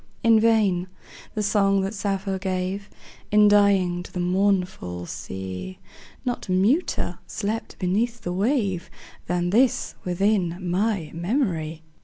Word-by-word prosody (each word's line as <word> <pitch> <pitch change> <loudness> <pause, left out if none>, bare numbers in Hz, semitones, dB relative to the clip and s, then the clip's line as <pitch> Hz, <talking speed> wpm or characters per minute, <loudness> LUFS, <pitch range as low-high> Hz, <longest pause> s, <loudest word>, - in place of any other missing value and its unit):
In 225 -1 +6
vain: 210 -5 +3 0.5
the 215 - 0
song 195 -1 +3
that 195 +2 -2
Sappho 195 -1 -2
gave, 190 +1 -3 0.4
In 210 0 +6
dying, 200 -4 +4
to - - -11
the 180 - -4
mournful 180 - 0
sea, 95 - -6 0.5
Not 245 -3 -2
muter 205 - +1
slept 220 +1 -4
beneath 225 +6 0
the 175 - -3
wave 200 -3 0 0.4
Than 175 0 0
this 245 +5 +2
within 180 -1 +1
my 185 -2 0
memory. 170 - -1
195 Hz, 120 wpm, -24 LUFS, 180-210 Hz, 0.5 s, In